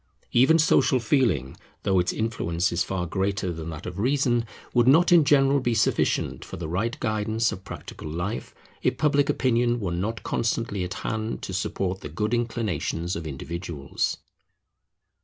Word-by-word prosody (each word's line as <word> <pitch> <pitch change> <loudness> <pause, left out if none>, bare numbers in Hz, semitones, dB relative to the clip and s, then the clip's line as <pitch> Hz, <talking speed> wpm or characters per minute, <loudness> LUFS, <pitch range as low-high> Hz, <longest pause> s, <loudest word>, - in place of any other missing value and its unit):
Even 135 +7 +5
Social 150 -4 +4
Feeling, 110 - +1 0.3
though 95 -1 +3
its 90 - +1
influence 100 -5 -1
is 85 0 +1
far 90 -2 -2
greater 95 0 -1
than 80 0 -6
that 80 -2 -7
of 90 +1 -6
Reason, 120 -1 +2 0.3
would 120 -1 +4
not 165 +7 +6
in 170 -3 +7
general 140 -1 +4
be 120 -3 0
sufficient - - +1
for - - -8
the 80 -1 -5
right 100 +8 -2
guidance 110 +1 0
of 95 - -7
practical 80 - -8
life, 85 +8 -4 0.3
if - - +1
Public 145 -2 +2
Opinion 120 -1 +2
were 95 -5 -2
not 100 +7 -3
constantly 115 -4 -1
at 90 +2 -4
hand 110 0 -3
to 95 - -5
support 95 0 -2
the 75 - -6
good 105 +9 -2
inclinations 95 -8 -1
of 80 -1 -5
individuals. 75 0 -3
105 Hz, 160 wpm, -25 LUFS, 85-120 Hz, 0.3 s, in